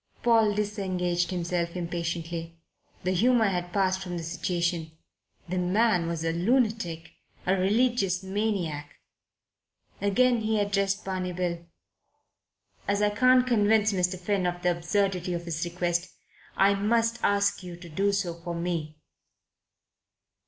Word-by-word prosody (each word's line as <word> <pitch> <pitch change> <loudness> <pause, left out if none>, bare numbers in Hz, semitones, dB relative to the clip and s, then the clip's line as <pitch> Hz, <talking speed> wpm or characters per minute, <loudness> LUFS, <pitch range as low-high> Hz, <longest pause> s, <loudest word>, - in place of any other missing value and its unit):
Paul 225 -3 +4
disengaged 185 -4 -1
himself 175 -1 -2
impatiently. 170 -1 -4 0.5
The 185 - +1
humour 230 +5 +3
had 175 -2 -3
passed 190 -1 +1
from 180 -2 -4
the 165 - -5
situation. 170 -1 -2 0.5
The 185 +1 -1
man 180 -1 +2
was 165 -1 -3
a 165 - +1
lunatic, 185 -4 0 0.3
a 185 - +3
religious 195 -1 +1
maniac. 190 -7 -2 1.1
Again 240 +5 +3
he 220 0 +1
addressed 200 -1 0
Barney 185 -1 -3
Bill. 170 -1 -2 1.2
"As 200 +1 +1
I 205 - +3
can't 255 +4 +4
convince 215 -2 +3
Mr. 180 0 0
Finn 185 0 0
of 175 0 -4
the 180 - +3
absurdity 180 +1 0
of 170 0 -5
his 160 -2 -3
request, 175 0 -1 0.5
I 195 +1 +5
must 230 +3 +1
ask 200 0 +2
you 180 -2 -8
to 175 0 -11
do 195 +5 +1
so 195 -4 -1
for 170 +1 -6
me." 165 -3 -3
185 Hz, 130 wpm, -27 LUFS, 170-205 Hz, 1.2 s, I